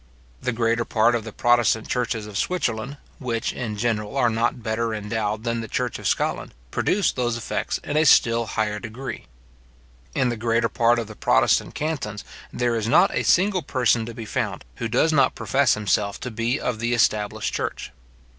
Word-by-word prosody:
The -, -, -1 dB
greater 115 Hz, 0 st, +1 dB
part 115 Hz, +1 st, +2 dB
of 115 Hz, -2 st, -1 dB
the 110 Hz, -, -6 dB
protestant 120 Hz, -1 st, +2 dB
churches 120 Hz, -3 st, -1 dB
of 105 Hz, -1 st, -10 dB
Switzerland, 130 Hz, -, -1 dB, 0.2 s
which, 120 Hz, -4 st, -2 dB
in 110 Hz, -4 st, -4 dB
general, 110 Hz, +2 st, -1 dB
are 120 Hz, -3 st, +3 dB
not 115 Hz, +2 st, -1 dB
better 110 Hz, 0 st, -1 dB
endowed 105 Hz, 0 st, -2 dB
than 115 Hz, -1 st, -1 dB
the 115 Hz, -, -6 dB
church 125 Hz, +2 st, -2 dB
of -, -, -3 dB
Scotland, -, -, -1 dB, 0.2 s
produce 200 Hz, -1 st, +1 dB
those 120 Hz, -2 st, -1 dB
effects 120 Hz, -, -2 dB
in 145 Hz, -, -4 dB
a 155 Hz, -, +4 dB
still 115 Hz, -5 st, +4 dB
higher 105 Hz, -1 st, -1 dB
degree. 120 Hz, +5 st, -7 dB, 0.9 s
In 125 Hz, -, +2 dB
the 120 Hz, -, -3 dB
greater 115 Hz, +1 st, +1 dB
part 120 Hz, -1 st, +3 dB
of 115 Hz, -, -2 dB
the 110 Hz, 0 st, -11 dB
protestant -, -, +2 dB
cantons, 135 Hz, -10 st, -3 dB, 0.3 s
there 120 Hz, -1 st, 0 dB
is 110 Hz, -1 st, -1 dB
not 180 Hz, -, +4 dB
a -, -, +1 dB
single 190 Hz, 0 st, +3 dB
person 125 Hz, -5 st, +1 dB
to 115 Hz, -, -7 dB
be 115 Hz, -2 st, -6 dB
found, -, -, -3 dB
who 115 Hz, -, -2 dB
does 130 Hz, +8 st, +2 dB
not 140 Hz, -, +3 dB
profess 140 Hz, +1 st, +2 dB
himself 105 Hz, -1 st, 0 dB
to 125 Hz, -, -5 dB
be 115 Hz, +4 st, -1 dB
of 120 Hz, -3 st, -2 dB
the 120 Hz, +1 st, 0 dB
established 105 Hz, -3 st, +1 dB
church. -, -, -4 dB
115 Hz, 185 wpm, -23 LUFS, 110-125 Hz, 0.9 s, a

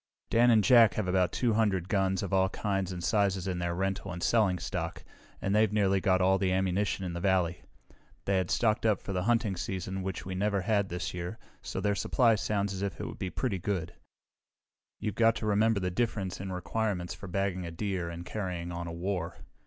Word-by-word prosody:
"Dan 120 Hz, +2 st, +5 dB
and 110 Hz, -3 st, +5 dB
Jack 115 Hz, -1 st, +6 dB
have 110 Hz, -4 st, -1 dB
about 90 Hz, -1 st, +2 dB
two 120 Hz, -3 st, +1 dB
hundred 100 Hz, -5 st, +1 dB
guns 95 Hz, -2 st, +1 dB
of 100 Hz, -, -4 dB
all 95 Hz, 0 st, +3 dB
kinds 95 Hz, -2 st, -2 dB
and 90 Hz, -1 st, -5 dB
sizes 100 Hz, -3 st, +1 dB
in 90 Hz, -2 st, -2 dB
their 85 Hz, 0 st, -1 dB
rental 95 Hz, +1 st, -2 dB
and 85 Hz, 0 st, -5 dB
selling 105 Hz, -6 st, +3 dB
stock, -, -, -4 dB, 0.4 s
and 95 Hz, -, -1 dB
they've 110 Hz, 0 st, +4 dB
got 105 Hz, -, -4 dB
nearly 95 Hz, -2 st, +2 dB
all 95 Hz, 0 st, +3 dB
the 95 Hz, -2 st, +1 dB
ammunition 95 Hz, +1 st, 0 dB
in 90 Hz, -, -4 dB
the 85 Hz, -, -4 dB
valley. 90 Hz, -2 st, +1 dB, 0.6 s
They 100 Hz, -1 st, +2 dB
had 95 Hz, -2 st, 0 dB
stocked 110 Hz, -2 st, +2 dB
up 110 Hz, -4 st, +3 dB
for 100 Hz, -, -6 dB
the 90 Hz, -, 0 dB
hunting 115 Hz, -4 st, +2 dB
season, 95 Hz, +1 st, -4 dB
which 95 Hz, 0 st, -4 dB
we 95 Hz, -, -4 dB
never 100 Hz, +1 st, 0 dB
had 100 Hz, 0 st, +1 dB
this 90 Hz, +1 st, -4 dB
year, 90 Hz, +4 st, -5 dB, 0.2 s
so -, -, -4 dB
their 105 Hz, -, +1 dB
supply 115 Hz, +3 st, +3 dB
sounds 100 Hz, -2 st, -1 dB
as 95 Hz, -, -5 dB
if 100 Hz, -3 st, -3 dB
it -, -, -3 dB
would -, -, -7 dB
be 95 Hz, -, -2 dB
pretty 100 Hz, +1 st, -2 dB
good. 90 Hz, -3 st, -2 dB, 1.1 s
You've 105 Hz, -, -2 dB
got 115 Hz, +2 st, +4 dB
to 115 Hz, -, -4 dB
remember 105 Hz, +1 st, +3 dB
the 90 Hz, -1 st, -1 dB
difference 100 Hz, -3 st, -2 dB
in 95 Hz, -1 st, -5 dB
requirements 90 Hz, -1 st, -2 dB
for 100 Hz, +2 st, -9 dB
bagging 95 Hz, -1 st, -1 dB
a -, -, -4 dB
deer 90 Hz, 0 st, -3 dB
and 85 Hz, +1 st, -7 dB
carrying 90 Hz, -3 st, -4 dB
on 85 Hz, 0 st, -5 dB
a -, -, -5 dB
war. 90 Hz, 0 st, -3 dB
95 Hz, 215 wpm, -30 LUFS, 90-105 Hz, 1.1 s, Jack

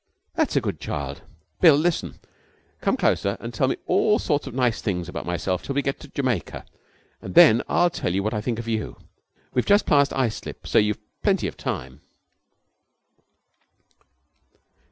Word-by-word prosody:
'That's -, -, 0 dB
a -, -, +3 dB
good -, -, -3 dB
child. 70 Hz, -1 st, -5 dB, 0.4 s
Bill, 160 Hz, -5 st, +7 dB
listen. 165 Hz, +3 st, -1 dB, 0.6 s
Come -, -, +1 dB
closer 100 Hz, 0 st, +1 dB
and 115 Hz, +1 st, -7 dB
tell 130 Hz, +4 st, +1 dB
me -, -, 0 dB
all 210 Hz, 0 st, +3 dB
sorts 145 Hz, -7 st, -1 dB
of 135 Hz, -, -7 dB
nice 125 Hz, -3 st, +1 dB
things 90 Hz, -5 st, -2 dB
about -, -, -6 dB
myself 90 Hz, +1 st, -1 dB
till 140 Hz, -, -5 dB
we 140 Hz, -, +1 dB
get 140 Hz, -, -2 dB
to 150 Hz, -, -11 dB
Jamaica, 130 Hz, -, -3 dB, 0.6 s
and 95 Hz, -, -8 dB
then 110 Hz, +2 st, +8 dB
I'll 175 Hz, 0 st, +3 dB
tell 90 Hz, -, -2 dB
you 95 Hz, +2 st, 0 dB
what 110 Hz, +2 st, -1 dB
I 105 Hz, -, -1 dB
think 115 Hz, 0 st, -2 dB
of 115 Hz, 0 st, -6 dB
you. 110 Hz, -2 st, -3 dB, 0.6 s
We've 125 Hz, -, +2 dB
just 205 Hz, +1 st, +4 dB
passed 140 Hz, -1 st, +3 dB
Islip, 125 Hz, -5 st, -3 dB
so -, -, +3 dB
you've 105 Hz, 0 st, +1 dB, 0.2 s
plenty -, -, +1 dB
of -, -, -4 dB
time.' 65 Hz, +3 st, -5 dB
115 Hz, 170 wpm, -24 LUFS, 100-140 Hz, 0.6 s, then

